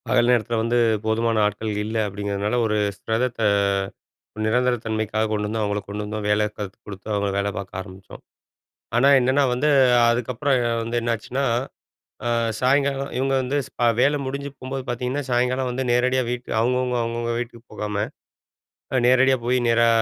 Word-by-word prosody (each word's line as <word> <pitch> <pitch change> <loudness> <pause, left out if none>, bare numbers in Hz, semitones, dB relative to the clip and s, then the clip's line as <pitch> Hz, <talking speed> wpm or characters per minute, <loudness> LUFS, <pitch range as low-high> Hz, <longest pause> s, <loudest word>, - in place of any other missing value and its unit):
பகல் 120 - +3
நேரத்துல 120 -1 +2
வந்து 115 +2 +1 0.3
போதுமான 110 0 +1
ஆட்கள் 105 +1 -2
இல்ல, 110 +1 -3
அப்டிங்கிறதுனால, 100 +2 -2
ஒரு 105 -1 0 0.2
ஸ்பெரத்த 115 +3 -2 1.0
ஒரு 110 - -5
நிரந்தர 125 +3 +2
தன்மைக்காக 110 0 -1
கொண்டு 105 -1 -1
வந்தோம், 110 +1 -2
அவங்கள 105 0 -1
கொண்டு 105 +1 -4
வந்தோம் 105 0 -4
வேலை 105 +1 +3
கத்து 100 -2 -6
கொடுத்து 100 0 -9
அவங்கள 100 -1 0
வேல 100 0 0
பாக்க 100 -1 -6
ஆரம்பிச்சோம். 95 -1 -12 0.7
ஆனா, 120 +3 +4
என்னன்னா 130 +3 +2
வந்து 135 +5 +1 0.4
அதுக்கப்புறம் 125 +4 0 0.3
வந்து 115 +1 -2
என்னாச்சுனா, 115 +3 -2 0.8
ஆ, - - 0 0.3
சாயங்காலம் 140 +1 +1
இவங்க 135 +1 0
வந்து 130 +3 -1
ஸ் - - -22
அ - - +5
வேல 145 +3 +3
முடிஞ்சு 140 +2 -4
போம்போது 130 +1 -5
பாத்தீங்கன்னா, 125 +4 -2
சாயங்காலம் 125 +1 +1
வந்து 130 +2 -2
நேரடியா 125 +1 +2
வீட்டு 125 0 -5
அவங்கவுங்க, 125 +2 +1
அவங்கவுங்க 115 0 -2
வீட்டுக்கு 120 -1 -7
போகாம, 105 -1 -2 0.9
அ 130 - +3
நேரடியா 130 +1 +5
போய் 125 +1 +2
நேரா 115 0 +4
120 Hz, 155 wpm, -23 LUFS, 110-125 Hz, 1.0 s, அ